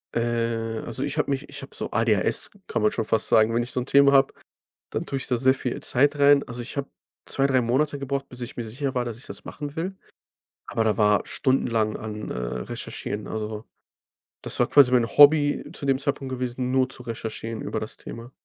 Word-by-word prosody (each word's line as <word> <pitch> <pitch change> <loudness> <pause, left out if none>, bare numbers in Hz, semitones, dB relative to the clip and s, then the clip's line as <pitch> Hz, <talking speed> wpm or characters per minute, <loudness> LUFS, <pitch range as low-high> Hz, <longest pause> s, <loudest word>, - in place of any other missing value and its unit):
Äh, 115 -1 -1
also, 115 - -3
ich 145 +1 -3
habe 150 - +1
mich 140 +1 -3
ich - - -8
habe - - -11
so - - -4
ADHS - - +1 0.2
kann - - -1
man 105 0 +3
schon 115 - -2
fast 110 +1 0
sagen. 110 +1 +4
Wenn 120 +1 +2
ich 120 - -5
so - - -1
'n 125 - -3
Thema 140 +1 +5
habe, 135 0 +5 0.6
dann - - -2
tue 140 - -3
ich - - -3
da 125 - +1
sehr 130 +2 +4
viel 125 -2 -3
Zeit 145 +3 +2
rein. 140 0 +6
Also, 120 0 -7
ich 120 +4 -7
habe 140 0 -2 0.4
2, 135 - +1
3 130 -2 +3
Monate 140 +5 +1
gebraucht, 140 0 -3
bis 125 - -11
ich 120 0 -6
mir 120 - -3
sicher 130 +5 -4
war, 125 -1 0
dass 115 -2 -6
ich 125 - -12
das - - -9
machen 145 -1 -7
will, 185 +4 -3 0.7
aber 115 - 0
da 110 -1 +1
war 105 -2 +4
stundenlang 115 -5 +1
an 105 -1 -6
äh, - - -4
recherchieren. 60 - -4
Also, 110 0 -5 0.8
das - - -3
war - - +4
quasi 140 -3 +6
mein 120 -2 +4
Hobby 145 +3 +6
zu - - -6
dem 135 -1 +2
Zeitpunkt 135 -1 -2
gewesen, 125 0 -2
nur 130 0 +2
zu 130 -1 -7
recherchieren 115 -1 -5
über - - -3
das - - -6
Thema. 115 +2 -9
125 Hz, 220 wpm, -25 LUFS, 115-140 Hz, 0.8 s, rein